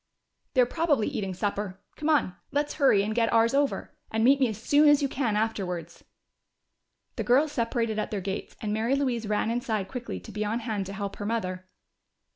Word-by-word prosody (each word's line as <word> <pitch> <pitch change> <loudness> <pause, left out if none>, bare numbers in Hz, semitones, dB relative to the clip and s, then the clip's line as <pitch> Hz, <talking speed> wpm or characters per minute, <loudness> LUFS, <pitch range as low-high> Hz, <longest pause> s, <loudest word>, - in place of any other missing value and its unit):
"They're 250 -1 +6
probably 290 -4 +1
eating 190 -3 -3
supper. 200 -1 -3 0.2
Come 305 +1 -2
on, 295 -12 +3 0.2
let's 290 +1 0
hurry 205 -8 +5
and 215 +1 -2
get 230 0 +2
ours 230 +1 +4
over. 280 0 0 0.2
And 220 0 0
meet 275 +3 +5
me 260 - +4
as 220 - -4
soon 295 +6 +5
as 290 0 +5
you - - +3
can 250 -5 -1
afterwards." 180 -6 -2 1.1
The - - -1
girls 280 +5 +3
separated 230 -3 -1
at - - -2
their 210 - -2
gates, 195 +1 -5
and 210 -1 -1
Mary 225 +5 +1
Louise 250 -5 -1
ran 210 +1 0
inside 225 -5 -1
quickly 245 - -5
to 90 - -11
be 215 - -2
on 220 +3 -1
hand 215 -4 -3
to 195 - -6
help 200 0 -5
her 205 - -5
mother. 185 -5 -3
225 Hz, 200 wpm, -27 LUFS, 205-260 Hz, 1.1 s, They're